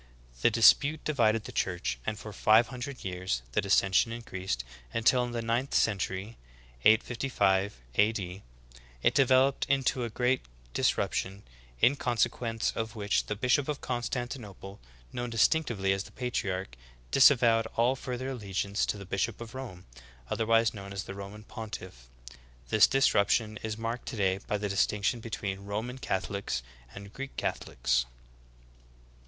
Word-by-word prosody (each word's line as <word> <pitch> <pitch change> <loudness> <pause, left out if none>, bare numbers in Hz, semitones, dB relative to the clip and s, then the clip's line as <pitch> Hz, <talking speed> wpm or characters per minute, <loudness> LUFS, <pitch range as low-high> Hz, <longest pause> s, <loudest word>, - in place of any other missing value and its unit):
The - - +5
dispute 140 +7 +5
divided 115 -7 +2
the - - -8
Church, 90 -9 -2
and 105 - -1
for 105 -1 -9
five 110 +3 +4
hundred 130 +1 -6
years 90 -9 -2
the - - +1
dissension 100 +2 +3
increased, 95 - -4 0.3
until 125 +2 +3
in 120 - -6
the 120 -1 -3
ninth 120 +4 -1
century 100 +1 0 0.5
(855 105 - +2
A. 105 - +4
D.) 95 -3 -6 0.6
it - - +4
developed 135 0 +3
into 135 -2 +1
a 120 - -2
great 125 +3 +1 0.3
disruption, 100 +2 0 0.4
in 135 - +5
consequence 120 -2 0
of 110 0 -3
Vv^hich 105 -2 0
the 105 - -2
bishop 125 +5 +2
of 150 -2 -3
Constan 120 0 -2
tinople, 100 -5 -9 0.3
known 120 0 -3
distinctively 115 -4 +2
as 95 +1 -3
the - - -13
patriarch, 95 - -3 0.4
disavowed 115 -4 +5
all 120 +3 +3
further 130 0 -5
allegiance 100 -4 -2
to - - -1
the 100 - -9
bishop 100 +4 -2
of 115 -1 -9
Rome, 120 -9 -8 0.5
otherwise 115 0 +3
known 100 -2 -8
as 100 0 -3
the - - -7
Roman 100 +2 -9
pontiflf. 105 - -8 0.6
This 110 +6 +6
disruption 110 -4 +2
is 110 -1 -4
marked 115 +2 -4
today 95 -3 0
by 105 - 0
the 105 0 -2
distinction 100 +3 +1
between 100 -3 -5
Roman 110 +6 -4
Catholics 95 - -2 0.3
and 100 +1 -10
Greek 135 0 -7
Catho - - -3
lics. - - +2
110 Hz, 145 wpm, -29 LUFS, 100-120 Hz, 0.6 s, This